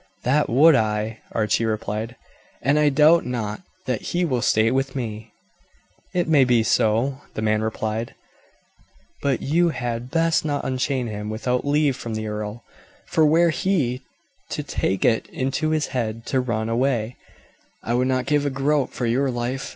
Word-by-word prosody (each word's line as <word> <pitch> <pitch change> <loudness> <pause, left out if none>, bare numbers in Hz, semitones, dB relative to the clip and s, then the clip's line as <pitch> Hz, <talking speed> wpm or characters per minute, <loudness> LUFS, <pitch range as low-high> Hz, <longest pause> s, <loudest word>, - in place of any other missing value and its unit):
"That 145 +4 +2
would 150 +7 +6
I," 110 -2 0
Archie 110 +1 +1
replied; 110 +1 -3 0.5
"and 140 +2 +3
I 150 -1 +4
doubt 155 +4 +5
not 115 - -4 0.2
that 125 -4 -1
he 175 0 -1
will 130 -7 0
stay 110 +1 +3
with 135 +1 -1
me." 110 -3 -5 0.8
"It 175 -2 0
may 150 -4 +5
be 120 -3 +3
so," 115 +6 +1
the 110 - -3
man 110 0 +2
replied; 110 +1 -3 1.1
"but 140 -3 0
you 170 +4 +2
had 120 -4 -4
best 165 +2 +2
not 145 -2 -2
unchain 130 0 -1
him 105 -2 -5
without 125 +5 -2
leave 145 -2 +2
from 115 -2 -5
the 110 0 -3
earl, 105 +2 -5 0.4
for 155 -1 +3
were 165 +2 +4
he 150 -9 0 0.5
to - - -3
take 95 - -1
it 115 - +2
into 135 +4 -2
his 155 -1 +1
head 115 -3 -3
to 130 - 0
run 115 -3 -2
away, 120 -1 0 0.7
I 115 - -2
would 125 +1 +2
not 130 -1 0
give 145 -1 +2
a 145 - 0
groat 135 +1 0
for 125 - -3
your 130 +4 +1
life. 125 +2 -3
125 Hz, 165 wpm, -23 LUFS, 110-145 Hz, 1.1 s, would